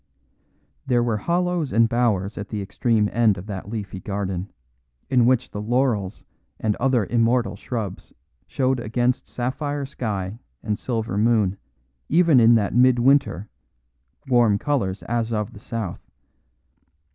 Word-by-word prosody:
There 120 -2 +3
were 115 -3 0
hollows 175 - -1
and 115 0 +4
bowers 110 -4 0
at 105 - -6
the 105 - -3
extreme 105 +2 +1
end 110 -4 +3
of 90 - -8
that 100 -2 -6
leafy 100 -4 -5
garden, 95 -1 -4 0.6
in 125 -3 +4
which 125 0 +2
the 105 - -5
laurels 110 -4 -1 0.3
and 105 -2 0
other 125 -4 +2
immortal 120 +2 +1
shrubs 110 -7 -5 0.4
showed 130 -1 0
against 120 +2 -1
sapphire 140 +3 -3
sky 105 -5 -4 0.2
and 105 -1 -2
silver 110 -5 -2
moon, 110 -4 +2 0.5
even 165 -4 +5
in 115 0 +6
that 105 -3 +1
midwinter, 125 -4 +3 0.8
warm 120 -5 +4
colours 110 -9 -1
as 115 0 -2
of 105 +1 -2
the 100 - -11
south. 110 -5 -5
115 Hz, 135 wpm, -23 LUFS, 105-125 Hz, 0.8 s, in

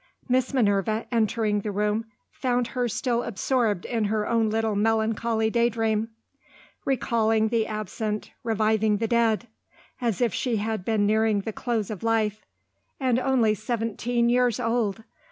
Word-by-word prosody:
Miss 255 -1 +1
Minerva, 215 -3 +1
entering 220 -2 +1
the 210 - -4
room, 210 +2 0 0.3
found 245 -2 -1
her 250 -2 -1
still 240 +1 0
absorbed 230 -3 0
in 230 -3 -1
her 210 0 0
own 230 -2 +2
little 220 -1 0
melancholy 220 +1 +1
daydream; 225 -2 +1 0.8
recalling 225 -4 +1
the 225 -1 +1
absent, 215 0 -4
reviving 220 -1 +2
the 225 +2 -1
dead 230 0 +2 0.5
as 230 -5 0
if 240 -4 +1
she 245 -3 -1
had 215 -2 -2
been 215 0 +1
nearing 215 0 +2
the 220 +2 -5
close 225 -3 -2
of 210 - -6
life. 220 -2 0 0.6
And 255 -3 +2
only 255 -4 +2
seventeen 235 +2 -1
years 245 0 +2
old. 225 -3 0
225 Hz, 140 wpm, -25 LUFS, 215-235 Hz, 0.8 s, own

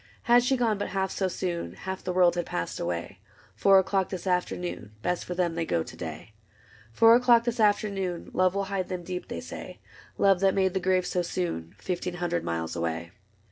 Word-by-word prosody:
Had 240 +1 +6
she 260 +2 +1
gone 225 -4 +1
but - - -2
half 190 -1 -1
so 190 - 0
soon. 175 -2 -3
Half 190 0 -6
the 185 - -2
world 180 -1 +4
had 175 -1 -3
passed 85 - -3
away. 85 +2 -4 0.4
Four 195 -1 +5
o'clock 190 0 +2
this 185 -1 -5
afternoon. 180 - -2
Best 180 - 0
for 180 - -5
them 175 -2 +1
they 165 0 -1
go 85 - 0
to - - -11
day. 110 - -7 0.6
Four 230 - +6
o^clock 240 -2 +5
this 240 0 -2
afternoon 200 -4 0
Love 185 0 +2
will 200 - 0
hide 195 -2 -3
them 180 -2 -4
deep, 180 +1 -5
they - - -5
say; - - -8 0.4
Love 195 -2 +4
that 195 0 +3
made 190 -2 +2
the 190 - 0
grave 185 0 +1
so 180 - 0
soon. 170 - -3
Fifteen 180 - -3
hundred 175 -1 -1
miles 80 0 -3
away. 85 0 -3
185 Hz, 205 wpm, -27 LUFS, 170-195 Hz, 0.6 s, Had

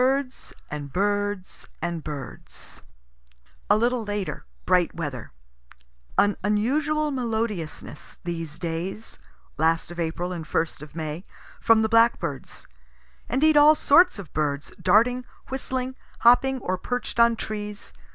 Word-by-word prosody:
BIRDS 265 0 -1 0.2
AND 145 -2 -5
BIRDS 205 0 -2
AND 170 -1 -3
BIRDS 145 -4 -8 0.9
A 205 - +6
little 240 +1 +1
later 205 -2 -4 0.2
bright 180 -2 +2
weather. 145 -8 -5 0.9
An 205 0 +3
unusual 290 +9 +1
melodiousness, 225 - -3
these 165 -3 -5
days, 170 +6 -5 0.4
(last 165 +1 +1
of 175 - -8
April 170 +2 -2
and 165 -3 -6
first 160 -2 -1
of 150 0 -11
May) 160 +1 -4 0.4
from 225 -1 +4
the - - +2
blackbirds; 230 - +1 0.6
indeed 300 +5 +3
all 295 +1 +8
sorts 320 +2 +5
of 185 -7 -10
birds, 145 -2 -1
darting, 235 +7 +4 0.3
whistling, 260 -1 -3 0.3
hopping 265 +3 +5
or 185 0 -2
perch'd 245 +2 -3
on 235 0 +6
trees. 210 -2 -6
205 Hz, 120 wpm, -25 LUFS, 165-245 Hz, 0.9 s, all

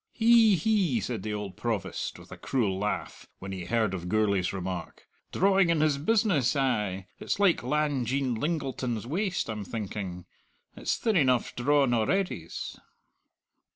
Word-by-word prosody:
"Hi 225 -3 +6
hi!" 190 - +2
said 110 +1 -3
the 105 +1 -3
old 105 -2 -5
Provost, 115 -5 -3
with - - -15
a - - -6
cruel 105 -8 -1
laugh, 105 +1 -3
when 95 +1 -7
he 95 -2 -5
heard 110 +1 +1
of 90 -1 -4
Gourlay's 100 -3 +1
remark 95 -1 -5 0.3
"drawing 195 -1 +3
in 165 -2 +2
his 150 -2 +2
business, 175 - +2
ay! 105 -9 0
It's - - -2
like 200 -4 +4
Lang 150 -3 0
Jean 135 0 0
Lingleton's 130 -4 -2
waist, 180 - -1
I'm 110 -2 -4
thinking. 95 -4 -5 0.5
It's - - -1
thin 225 -3 0
eneugh 130 -5 +2
drawn 135 0 +3
a'readys!" 115 - -1
125 Hz, 150 wpm, -28 LUFS, 105-160 Hz, 0.5 s, Hi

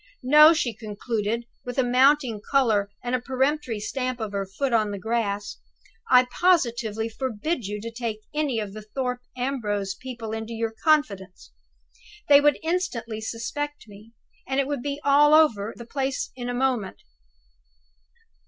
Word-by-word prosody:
No!" 300 +4 +8
she 290 -8 0
concluded, 220 +1 -3 0.2
with 245 +1 -6
a 260 - +4
mounting 255 -2 +3
color 220 -8 +2
and 245 0 -3
a 255 - +1
peremptory 265 -2 -1
stamp 255 +3 -3
of 220 -2 -4
her 200 -1 -3
foot 240 +7 -2
on 215 -2 +2
the 200 - -4
grass. 205 -1 -2 0.5
"I 250 0 +6 0.2
positively 235 - +2
forbid 250 - -3
you 210 +1 -4
to 230 +1 -6
take 230 -2 -4
any 300 -5 0
of 205 -2 -5
the 215 - -8
Thorpe 250 +3 -4 0.2
Ambrose 210 -7 -2
people 235 +1 -7
into 220 +1 -5
your 225 0 -2
confidence. 200 - 0 0.8
They 285 0 +8
would 295 0 +4
instantly 260 -11 -2
suspect 265 +6 -5
me, 210 +2 -15 0.3
and 265 0 0
it 275 - +2
would 285 -2 -3
be 285 +2 -3
all 295 +2 +6
over 225 -10 +3
the 235 - -9
place 270 +1 -3
in 245 -1 -5
a - - -2
moment. 245 -6 -1
240 Hz, 155 wpm, -25 LUFS, 215-275 Hz, 0.8 s, No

